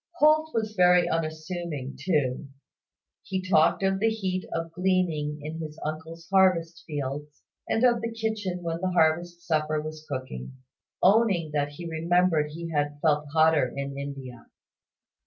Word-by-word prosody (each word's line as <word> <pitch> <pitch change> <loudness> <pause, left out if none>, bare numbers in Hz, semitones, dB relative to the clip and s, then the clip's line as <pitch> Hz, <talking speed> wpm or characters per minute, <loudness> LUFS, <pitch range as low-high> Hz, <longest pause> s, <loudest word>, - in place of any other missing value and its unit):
Holt 310 -1 +4
was 220 -4 -2
very 180 -2 +5
unassuming 155 -3 -3
too. 140 -3 0 0.7
He 190 - -3
talked 175 -1 +3
of 190 0 +2
the 225 +2 +3
heat 190 -4 -3
of 165 0 -3
gleaning 170 -4 0
in 155 +2 -5
his 155 -1 -7
uncle's 160 +2 -6
harvest 180 -3 +3
fields, 145 0 -5 0.3
and 225 - +1
of 240 -2 +4
the 230 0 -3
kitchen 220 -5 -3
when 165 0 -3
the 185 - 0
harvest 175 0 +1
supper 155 -2 +1
was 155 0 -7
cooking; 130 - -5 0.5
owning 195 -6 +4
that 145 -1 -1
he 170 +4 -8
remembered 165 -1 +2
he 165 +2 -6
had 145 -1 -1
felt 150 -1 +2
hotter 160 -3 +4
in 140 0 -4
India. 135 -4 -7
165 Hz, 145 wpm, -27 LUFS, 150-185 Hz, 0.7 s, very